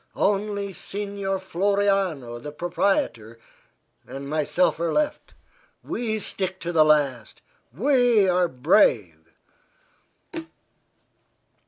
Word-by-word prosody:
Only 200 0 -1
Signor 200 0 -4
Floriano, 190 -9 0
the 150 - -7
proprietor, 150 - -1 0.7
and 140 +1 -7
myself 155 +4 +1
are 170 0 0
left. 300 -1 -2 0.5
We 225 -2 -2
stick 190 -2 -3
to 175 - -3
the 160 -2 +5
last. 140 -7 +1 0.3
We 240 - +3
are 180 -1 +3
brave." 155 - +2
185 Hz, 85 wpm, -24 LUFS, 150-200 Hz, 0.7 s, the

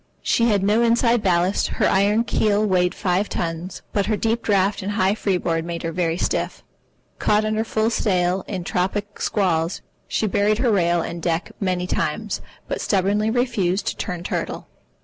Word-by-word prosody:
She 235 - +2
had 200 -3 +2
no 210 +3 +3
inside 235 0 +3
ballast, 185 0 +2
her - - +3
iron 205 +4 +3
keel 215 -2 +1
weighed 180 -3 +2
five 190 +1 0
tons, 170 +2 -4
but 200 -1 +1
her 215 -1 +1
deep 225 +3 0
draught 200 -1 +1
and 200 +2 -3
high 195 -1 +2
freeboard 180 -6 -1
made 170 0 -5
her 165 - -2
very 165 -1 0
stiff. - - -2 0.6
Caught 210 +1 +2
under 215 +1 0
full 220 0 0
sail 185 -4 +1
in 185 -4 -4
tropic 200 +4 -2
squalls, 170 -4 0 0.2
she - - 0
buried 205 +1 +2
her 240 0 +2
rail 175 -4 +2
and 170 0 -5
deck 165 +1 -1
many 185 -2 -1
times, - - -2 0.3
but - - -3
stubbornly 205 +2 +1
refused 220 -6 0
to - - -5
turn 180 -3 -4
turtle. - - -3
195 Hz, 170 wpm, -22 LUFS, 180-215 Hz, 0.6 s, no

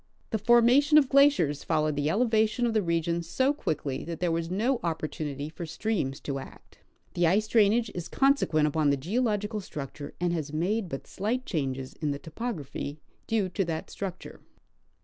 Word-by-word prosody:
The 220 - 0
formation 240 +7 +5
of 280 -4 +5
glaciers 275 - +4
followed 155 -1 +1
the 145 +1 0
ele 230 +9 +2
vation 220 +2 +2
of 235 - 0
the 215 - +3
region 170 -1 0
so 260 - +1
quickly, 150 - -3
that 165 0 -5
there 175 -1 +1
was 165 0 -1
no 230 +7 +1
opportunity 155 -3 -3
for 165 +2 -7
streams 160 -7 -2
to 140 -1 -3
act. - - -13 0.3
The 175 -1 +2
ice 205 +5 +2
drainage 225 +1 +3
is 175 -2 -5
consequent 270 - +3
upon 150 0 +1
the 140 - +2
geological 210 - -1
structure, 145 -4 -7
and 175 0 0
has 155 -3 -3
made 185 +6 -1
but 135 - -5
slight 235 +6 -2
changes 135 -5 -3
in 155 - -3
the 140 - -1
topography 155 - -5 0.3
due 220 -4 +1
to 190 +2 0
that 160 -2 -4
structure. 190 -3 -7
175 Hz, 175 wpm, -28 LUFS, 155-225 Hz, 0.3 s, formation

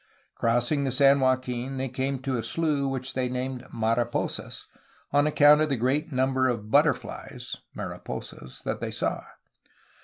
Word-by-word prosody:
Crossing 120 +5 +1
the 135 - 0
San 140 +2 +5
Joaquin 130 0 0
they 130 +1 -1
came 135 +2 -2
to 135 -1 -1
a 120 - -1
slough 150 -1 0
which 135 0 -4
they 130 -1 -1
named 125 0 -3
'^Mariposas" 115 +1 -2 0.5
on 145 +1 +4
account 150 0 +6
of 155 - +2
the 135 - 0
great 140 +7 0
number 130 0 +2
of 110 -4 -3
but - - +6
terflies - - -4 0.2
(mariposas) 65 - -7
that - - -3
they - - -2
saw. - - -2
130 Hz, 155 wpm, -27 LUFS, 125-140 Hz, 0.5 s, account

